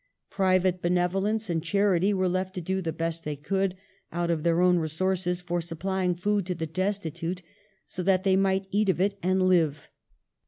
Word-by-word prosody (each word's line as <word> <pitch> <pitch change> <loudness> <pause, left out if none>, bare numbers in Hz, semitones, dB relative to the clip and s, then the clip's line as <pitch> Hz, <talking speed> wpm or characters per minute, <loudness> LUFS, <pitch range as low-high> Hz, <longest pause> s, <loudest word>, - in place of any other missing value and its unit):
Private 185 -1 +2
benevolence 190 +5 0
and 165 -2 -1
charity 200 -1 +2
were 185 -2 +1
left 185 +1 -2
to - - -2
do 190 +3 -2
the 165 -3 -2
best 165 0 -3
they 150 -1 -3
could, 190 +6 -1 0.3
out 170 0 -1
of 160 -2 0
their 170 +1 +2
own 180 -1 +4
resources, 180 +3 -1
for 175 -1 -2
supplying 180 +2 -2
food 200 +1 0
to 180 - -1
the 165 -1 -3
desti 185 0 -2
tute, 175 +2 -4 0.4
so 180 - -5
that 185 0 +2
they 190 -1 +3
might 190 0 +2
eat 205 0 +2
of 185 - +1
it 200 +1 0
and 185 +1 +2
live. 160 -6 +2
185 Hz, 190 wpm, -27 LUFS, 170-190 Hz, 0.4 s, own